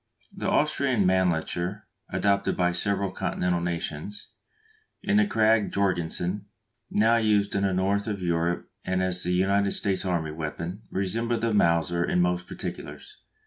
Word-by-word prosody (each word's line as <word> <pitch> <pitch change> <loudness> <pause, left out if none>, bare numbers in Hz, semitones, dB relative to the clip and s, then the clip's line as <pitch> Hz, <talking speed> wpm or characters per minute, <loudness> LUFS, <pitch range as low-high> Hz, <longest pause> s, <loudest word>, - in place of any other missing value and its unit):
The - - -2
Austrian 140 -8 +2
Mannlicher, 90 +2 0 0.3
adopted 100 0 +1
by 90 -1 +2
several 100 +2 0
continental 90 -2 -1
nations, 85 +3 -4 0.7
and 205 +1 +3
the 210 - +3
Krag 110 - +3
Jorgensen 95 0 -1 0.4
now 115 +2 +3
used 105 -3 +2
in 100 - 0
the 100 -1 +2
north 100 +3 0
of 105 -2 -2
Europe 85 -1 -1
and 95 0 0
as 90 -1 -1
the 90 - -2
United 100 +2 +2
States 95 -1 -1
army 85 -5 -1
weapon, 85 +5 -5
resemble 115 +5 -1
the 115 0 0
Mauser 85 -3 +2
in 90 - +1
most 90 0 +1
particulars. - - -7
95 Hz, 145 wpm, -26 LUFS, 90-105 Hz, 0.7 s, and